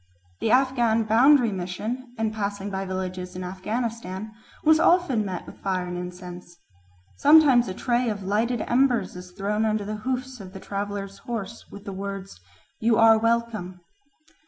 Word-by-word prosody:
The - - 0
Afghan 240 -3 +3
Boundary 240 +2 +5
Mission, 215 +7 -5
in 220 -1 0
passing 205 -2 -3
by 195 0 -3
villages 185 -1 -4
in 185 - -5
Afghanistan, 210 +1 -4 0.3
was 315 0 +5
often 330 -10 +3
met 185 -3 -5
with - - -13
fire 185 -2 -1
and 180 0 -5
incense. 180 -1 -8 0.6
Sometimes 280 - +6
a 185 - -4
tray 245 +1 0
of 205 -2 -4
lighted 220 +4 0
embers 245 -3 +1
is 180 0 -9
thrown 205 +4 -1
under 215 -1 0
the 215 +1 -4
hoofs 255 +2 -4
of 190 -2 -10
the 195 - -8
traveller's 200 0 -5
horse, 225 -5 -6
with 200 0 -11
the 200 - -5
words, 195 - -6 0.4
"You 225 0 +3
are 225 -1 +6
welcome." 225 -6 -1
210 Hz, 160 wpm, -25 LUFS, 190-235 Hz, 0.6 s, Sometimes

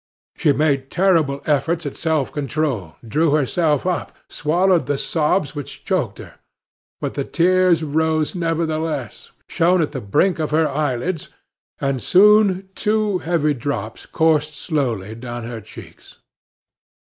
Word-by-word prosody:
She 155 - +2
made 140 -2 +1
terrible 165 -7 +2
efforts 160 +3 0
at 145 - -4
self 160 -4 0
control, 140 - -2
drew 150 +6 +2
herself 150 +1 +1
up, 180 -1 -2
swallowed 170 0 +1
the 145 -1 0
sobs 155 +1 0
which 145 -2 -8
choked - - -1
her; - - -12 0.6
but - - -3
the - - -2
tears 180 -1 +3
rose 155 +1 0
nevertheless, 160 - -2 0.2
shone 180 +2 +2
at 155 -3 0
the 135 -3 -5
brink 165 - +1
of 155 - -1
her 155 +1 +2
eyelids, 150 +3 -2 0.5
and 135 -2 -1
soon 195 - +4
two 210 -3 0
heavy 160 -4 +1
drops 120 -5 -5
coursed 155 -2 +1
slowly 120 - -2
down 120 +1 -7
her 115 -1 -6
cheeks. 105 - -14
155 Hz, 135 wpm, -20 LUFS, 140-170 Hz, 0.6 s, soon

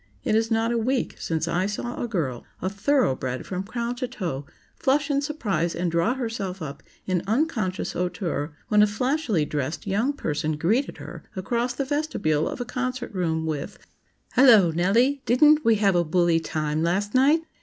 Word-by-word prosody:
It - - 0
is 225 +1 +2
not 225 0 +1
a 235 - +1
week 255 +3 -1
since 160 0 -2
I 180 +3 0
saw 240 +4 -4
a 240 - -1
girl, 150 - -2 0.2
a 185 - -2
thoroughbred 200 - 0
from 185 -1 -3
crown 235 +4 -3
to 255 0 -2
toe, 170 - -4 0.3
flush 285 +2 +1
in 280 0 +2
surprise 200 - -1
and 175 0 -1
draw 170 +9 +1
herself 220 -7 -4
up 150 -4 -7 0.2
in 185 -2 0
unconscious 220 - 0
hauteur, 175 -4 -2 0.2
when 210 0 +4
a 210 - +6
flashily 230 - 0
dressed 145 +1 -3
young 215 +8 +1
person 155 - -2
greeted 220 - 0
her - - -9
across 235 +5 -1
the 275 - -2
vestibule 260 - 0
of - - -6
a 245 - -3
concert 250 -1 -3
room 160 -4 -1
with 150 -3 -4 0.6
"Hello, 225 -10 +7
Nellie! 230 - +2
didn't 300 +5 +5
we 225 -1 +4
have 200 -2 +3
a 175 -1 +3
bully 170 0 +2
time 155 -1 -2
last 190 +5 0
night?" 285 +5 +4
205 Hz, 175 wpm, -25 LUFS, 170-250 Hz, 0.6 s, Hello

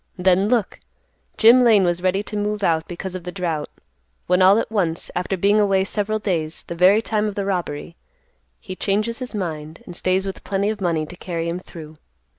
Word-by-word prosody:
Then, 185 +2 +3
look! 230 -5 0 0.6
Jim 240 +3 +7
Lane 220 -5 +5
was 175 0 0
ready 185 +2 +1
to 210 - -8
move 210 0 -2
out 165 -2 +1
because 180 +1 -6
of 185 -2 -6
the 180 - -6
drought, 170 -5 -3 0.6
when 180 +1 +2
all 190 +3 +7
at 225 - -2
once, 175 -6 -1
after 180 +2 -2
being 200 +4 +3
away 195 -2 +2
several 210 +2 -1
days 170 -7 -3
the - - -7
very 185 +6 +4
time 215 -1 0
of 205 - -4
the 200 - -2
robbery, 170 -4 -3 0.6
he 185 - -8
changes 215 +5 -1
his 250 -3 -6
mind, 160 -5 -5
and 175 - -9
stays 185 +2 0
with 195 - -6
plenty 200 +2 0
of 215 -2 -7
money 165 -4 0
to 180 - -10
carry 170 -2 -4
him 170 +2 -3
through. 160 -4 -12
190 Hz, 205 wpm, -21 LUFS, 175-205 Hz, 0.6 s, Jim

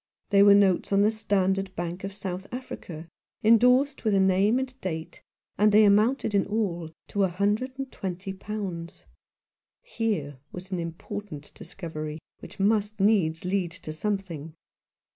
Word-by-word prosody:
They 200 -1 +6
were 200 0 +8
notes 195 -2 +3
on 200 0 +4
the 210 - +4
Standard 195 -3 0
Bank 175 +2 -4
of 195 - -4
South 190 -1 -6
Africa, 175 -10 -7 0.4
endorsed 250 +6 +4
with 215 -3 +2
a - - +4
name 190 +4 +3
and 260 0 -4
date, 160 -3 -5 0.4
and 210 +1 +5
they 215 +1 +7
amounted 215 +4 +3
in 200 -2 +2
all 190 -6 -2 0.2
to 205 - +1
a - - +4
hundred 205 +8 -1
and 270 -1 -5
twenty 190 +1 -5
pounds. 190 -4 -6 0.8
Here 205 - -2
was 185 +1 -9
an 185 - -1
important 165 -1 -7
discovery, 155 -3 -7 0.2
which - - -12
must 210 +1 +1
needs 185 -6 +2
lead 185 -1 0
to 170 -2 -8
something. 165 -4 -4
195 Hz, 150 wpm, -27 LUFS, 175-215 Hz, 0.8 s, were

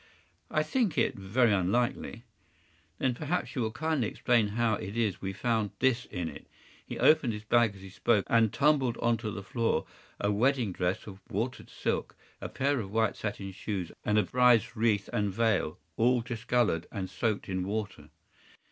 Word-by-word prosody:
” - - -41
“I - - +2
think 235 - 0
it - - +2
very 105 +4 +2
unlikely.” 115 +4 0 0.7
“Then 130 -1 +1
perhaps 155 +7 -2
you 130 - -1
will 110 -1 -1
kindly 155 -3 0
explain 115 -1 +2
how 115 +2 +1
it 105 +1 -4
is 110 -4 +2
that - - -21
we 95 - -2
found 110 +1 0
this 130 -1 +2
in 90 -4 -4
it?” 75 - -9 0.4
He - - -7
opened 140 -7 +4
his 105 0 -6
bag 115 -2 +3
as 95 - -13
he 95 - -9
spoke, 105 +1 +1
and 115 -2 +4
tumbled 140 -4 +2
onto 115 -1 0
the 100 -1 -6
floor 115 +4 0 0.3
a 100 - +1
wedding 120 0 +2
dress 90 +1 -2
of 95 -2 -10
watered 115 +4 -3
silk, - - -2 0.3
a - - -4
pair 140 0 0
of 100 -4 -5
white 110 0 +1
satin 100 -2 -4
shoes, 95 -2 -4
and 105 0 +1
a 105 - +5
bride’s 125 +2 +3
wreath 110 -3 +1
and 105 -3 0
veil, 105 -6 +1 0.2
all 120 +1 +3
discolored 115 -6 0
and 95 -4 -4
soaked 105 +2 -2
in 95 -2 -2
water. 105 +2 -4
110 Hz, 185 wpm, -30 LUFS, 100-120 Hz, 0.7 s, a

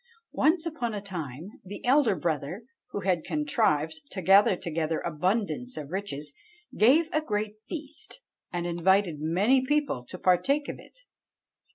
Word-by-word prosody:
"Once 320 +2 +2
upon 250 -9 -3
a - - -2
time 175 -4 -6
the 195 +2 -8
elder 255 -5 +4
brother, 160 - -2 0.3
who 205 - -4
had 180 -5 +1
contrived 160 - 0
to 190 - -6
gather 195 +2 +6
together 165 -2 -2
abundance 205 +9 -1
of 150 0 -6
riches, 150 -7 -4 0.4
gave 285 +9 +5
a 310 - +2
great 210 -5 -2
feast, 305 - -5 0.3
and 175 -1 -2
invited 175 0 +2
many 200 +12 +3
people 285 - 0
to 185 - -9
partake 270 +12 +2
of - - -6
it. - - -17
195 Hz, 145 wpm, -28 LUFS, 165-255 Hz, 0.4 s, gather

